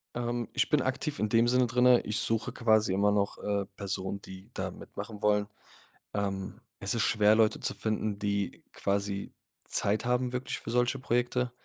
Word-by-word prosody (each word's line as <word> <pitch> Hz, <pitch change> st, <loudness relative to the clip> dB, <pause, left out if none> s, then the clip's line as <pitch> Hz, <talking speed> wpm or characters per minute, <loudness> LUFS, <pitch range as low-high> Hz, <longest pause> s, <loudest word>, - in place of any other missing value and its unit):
Ähm, 120 Hz, -1 st, -2 dB
ich -, -, +1 dB
bin 150 Hz, -3 st, +3 dB
aktiv 135 Hz, +3 st, -2 dB
in 110 Hz, -, +1 dB
dem 115 Hz, +2 st, +4 dB
Sinne 125 Hz, 0 st, +4 dB
drinne, 125 Hz, 0 st, +5 dB
ich 105 Hz, 0 st, 0 dB
suche 115 Hz, 0 st, 0 dB
quasi 110 Hz, -4 st, +3 dB
immer 100 Hz, +2 st, +3 dB
noch, 100 Hz, -1 st, 0 dB
äh, 100 Hz, -1 st, -1 dB
Personen, 95 Hz, 0 st, -3 dB
die 95 Hz, +4 st, -11 dB
da 95 Hz, -1 st, -3 dB
mitmachen 105 Hz, +3 st, -8 dB
wollen. 105 Hz, -1 st, +3 dB, 0.7 s
Ähm, 95 Hz, -2 st, -3 dB, 0.2 s
es -, -, -1 dB
ist -, -, +2 dB
schwer, 105 Hz, 0 st, +4 dB
Leute 110 Hz, -1 st, +3 dB
zu -, -, -1 dB
finden, 110 Hz, -1 st, -2 dB
die 100 Hz, -2 st, -2 dB
quasi 100 Hz, 0 st, -2 dB, 0.3 s
Zeit 105 Hz, +3 st, 0 dB
haben 125 Hz, 0 st, +1 dB
wirklich 125 Hz, +1 st, -3 dB
für -, -, -8 dB
solche 125 Hz, +2 st, +1 dB
Projekte, 125 Hz, 0 st, 0 dB
110 Hz, 175 wpm, -30 LUFS, 100-120 Hz, 0.7 s, drinne